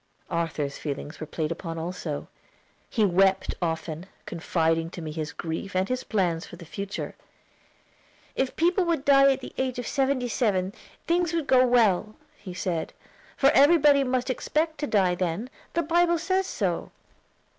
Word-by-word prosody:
Arthur's 160 -4 -2
feelings 145 +1 -5
were 155 - -5
played 155 0 -2
upon 165 -1 -5
also. 165 -3 -4 0.6
He 220 -4 +2
wept 190 +1 +3
often, 165 0 -3 0.2
confiding 165 -1 0
to 175 - -9
me 160 -2 -5
his 155 0 -4
grief 165 +4 -5
and 185 +1 +2
his 255 0 -2
plans 180 -6 0
for - - -10
the 170 0 -11
future. 195 +6 -5 1.2
"If 265 -1 -1
people 355 +3 +3
would 330 -5 0
die 275 -1 +7
at 265 0 -1
the - - -9
age 260 -1 -1
of 245 - -4
seventy 270 -2 0
five, 200 -6 0 0.3
things 345 0 +1
would 330 -3 0
go 255 -2 +5
well," 215 -4 +3 0.2
he 185 -4 -8
said, 175 -3 -2 0.4
"for 275 - +5
everybody 285 -1 +6
must 255 0 0
expect 310 +5 -1
to 295 - -1
die 190 -6 +3
then; 180 +7 -2 0.2
the 340 - +1
Bible 345 +2 +3
says 375 +3 0
so." - - -2
205 Hz, 160 wpm, -26 LUFS, 170-275 Hz, 1.2 s, die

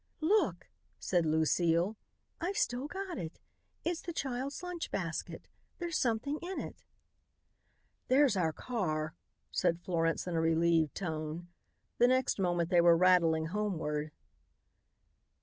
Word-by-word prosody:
"Look," 310 - +2 0.3
said 175 -3 +1
Lucile, 165 +5 +2 0.4
"I've 380 +4 -2
still 255 -8 0
got 385 0 -5
it. 160 -1 -6 0.4
It's 345 -1 -1
the 345 - -5
child's 270 +2 -3
lunch 360 -2 -4
basket. - - -4 0.3
There's 345 -2 -2
something 255 +5 0
in 360 +2 -4
it." - - -7 1.2
"There's 260 -3 +4
our 170 -4 +1
car," 155 -8 -2 0.4
said 170 -2 +1
Florence 165 -2 0
in 180 - -3
a 165 - +2
relieved 165 -1 +2
tone. 160 -1 -4 0.5
The 245 - +7
next 255 -3 +2
moment 175 -2 +1
they 175 -1 +6
were 170 -1 +6
rattling 165 -3 +4
homeward. 155 -8 -1
180 Hz, 125 wpm, -32 LUFS, 165-265 Hz, 1.2 s, The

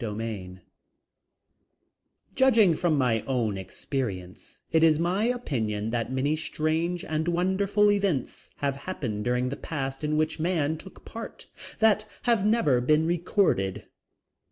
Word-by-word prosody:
CHAPTER 105 -2 -4
I 95 -5 -6 1.8
Judging 225 -9 +5
from 165 -3 +1
my 120 -5 +2
own 120 -6 0
experience 95 -2 -5
it 160 0 +4
is 160 -2 +5
my 180 +6 +1
opinion 115 - -1
that 120 +1 -2
many 135 +4 +1
strange 160 +3 -1
and 155 +1 -2
wonderful 190 +4 +2
events 195 -10 -1
have 140 -1 -2
happened 115 - -3
during 125 +1 +1
the 135 - -3
past 135 -2 -4
in 150 0 0
which 155 +1 0
man 160 -2 +1
took 190 - -13
part, 230 0 -8 0.3
that 215 -1 +3 0.2
have 235 -5 +2
never 205 - +3
been 155 +5 +3
recorded. 170 - +1
155 Hz, 130 wpm, -27 LUFS, 125-185 Hz, 1.8 s, Judging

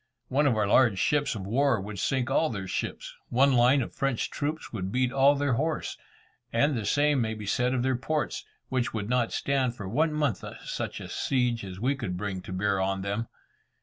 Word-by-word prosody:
One 145 +3 +3
of 125 - +3
our 105 - +2
large 110 0 +4
ships 145 +7 +1
of 95 -3 -5
war 125 +3 +2
would 100 0 -6
sink 130 +1 0
all 155 +3 +3
their 100 -5 -5
ships, - - -4 0.2
one 135 +3 +4
line 125 +2 +5
of - - -8
French 135 -4 -1
troops 150 +2 -3
would 95 0 -3
beat 125 +1 +1
all 135 +2 +5
their 140 -2 +1
horse, 155 +6 -1 0.6
and 140 +5 +2
the 110 -4 -2
same 145 +2 +3
may 110 -1 -1
be 105 -1 -7
said 125 +5 +1
of 125 - 0
their 130 0 +2
ports, 150 +5 -2 0.3
which 130 -3 -1
would 105 0 -3
not 125 -2 +2
stand 130 -3 0
for 100 -5 -6
one 155 +10 +1
month 150 -9 0 0.2
such - - -4
a - - -7
siege 125 -4 0
as 95 -1 -7
we 130 +6 +1
could 105 -9 -4
bring 95 -1 -3
to 90 - -9
bear 95 +1 0
on 95 0 -1
them. 100 +4 -2
125 Hz, 215 wpm, -28 LUFS, 105-140 Hz, 0.6 s, line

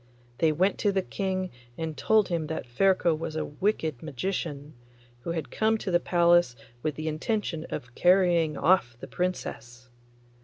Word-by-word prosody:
They 160 -2 +4
went 185 +6 +1
to 205 - +2
the 190 -1 0
King 185 -2 -2 0.3
and 160 -1 -4
told 215 +8 +3
him 165 -3 -1
that 160 - -4
Ferko 175 +7 +2
was 155 0 -4
a 155 - -1
wicked 160 - -1
magician, 155 -1 -4 0.5
who 170 +7 -4
had 155 -7 -4
come 220 0 +2
to 200 - -4
the 175 - +4
palace 175 -6 +3 0.3
with 150 +1 -2
the 155 0 -5
intention 165 +1 -2
of 120 -4 -6
carrying 175 -3 +3
off 140 -8 +2
the - - -7
Princess. 125 -9 -4
170 Hz, 160 wpm, -27 LUFS, 150-185 Hz, 0.5 s, They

